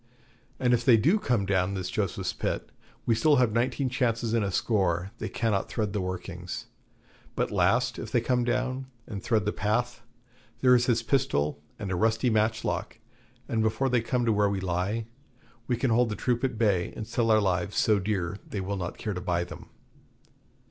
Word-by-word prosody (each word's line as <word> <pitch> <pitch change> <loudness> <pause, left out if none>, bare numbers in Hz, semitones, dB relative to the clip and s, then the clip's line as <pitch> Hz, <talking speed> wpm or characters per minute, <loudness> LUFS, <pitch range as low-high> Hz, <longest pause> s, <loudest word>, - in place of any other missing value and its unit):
And 125 -1 +3
if 120 0 +2
they 120 -2 +6
do 165 - +3
come 120 - +1
down 95 0 +1
this 90 -1 -3
Joseph's 95 -3 -2
Pit, - - -3 0.3
we 115 - +3
still 145 +7 +4
have 125 -4 +3
nineteen 125 +3 +1
chances 120 -3 0
in 115 - +3
a 100 - 0
score 95 -3 0
they - - -3
cannot 105 -4 0
thread 105 -3 -2
the 105 - -1
workings. 90 -1 -5 0.7
But - - 0
last, 115 +6 +2
if 110 - -6
they 120 - +3
come 125 +1 +1
down, 130 +2 -1 0.2
and 100 -4 -6
thread 110 -4 +1
the 105 - +1
path, 120 +4 -1 0.6
there 125 -1 +6
is 125 0 +4
this 115 -2 +2
pistol 75 - 0 0.2
and 100 -2 -4
a - - 0
rusty 110 +5 +2
matchlock; 110 +1 0 0.5
and 115 -1 0
before 110 +5 +1
they 125 -2 +2
come 120 +1 0
to 115 - +3
where 105 -1 +3
we 100 -1 -1
lie, 95 +5 -1 0.6
we 120 - +1
can 125 0 +1
hold 120 +1 +3
the 105 - -2
troop 120 +2 -1
at 130 -4 0
bay 100 -6 +2
and 110 - -5
sell 115 +1 0
our 110 -1 +6
lives 100 0 0
so 105 -2 +4
dear 95 -1 -2
they 100 - -3
will 100 +1 -3
not 90 -2 -4
care 105 - -3
to 90 - -5
buy 85 -1 0
them.' - - -10
110 Hz, 195 wpm, -28 LUFS, 95-120 Hz, 0.7 s, they